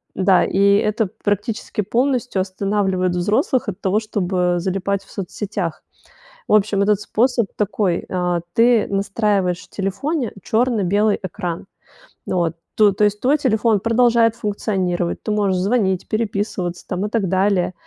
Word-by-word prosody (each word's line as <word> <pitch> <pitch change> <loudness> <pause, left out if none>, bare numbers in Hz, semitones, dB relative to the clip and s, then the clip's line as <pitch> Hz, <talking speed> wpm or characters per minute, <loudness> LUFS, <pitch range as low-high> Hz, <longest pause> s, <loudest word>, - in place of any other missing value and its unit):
Да, 190 -1 +4
и 190 - -1 0.2
это 215 0 0
практически 210 +2 -2
полностью 245 0 0
останавливает 190 -1 -1
взрослых 215 - +1
от 185 - -7
того, 195 +2 +1
чтобы 205 -4 -3 0.2
э - - -1
залипать 195 +2 -2
в - - -20
соцсетях. 195 -3 -4 0.6
В - - +1
общем, 205 -1 +3
этот 205 -1 +2
способ 235 0 +1
такой 200 -3 -1 0.5
ты 235 -1 +4
настраиваешь 200 -2 0
в - - -16
телефоне 230 - -2
чёрно-белый 215 -3 +1
экран. 175 -1 -4 0.6
Вот, 170 -3 0 0.2
то 210 -2 +5
то 205 +2 +1
есть 210 0 +1
твой 280 +4 +3
телефон 220 -5 +2
продолжает 230 0 +3
функционировать, 190 -5 -2
ты - - -4
можешь 200 -3 +1
звонить, 190 -2 0
переписываться 205 -5 -2
там 185 +2 -2
и - - -6
так 215 -4 0
далее, 190 0 +1
205 Hz, 140 wpm, -20 LUFS, 190-220 Hz, 0.6 s, то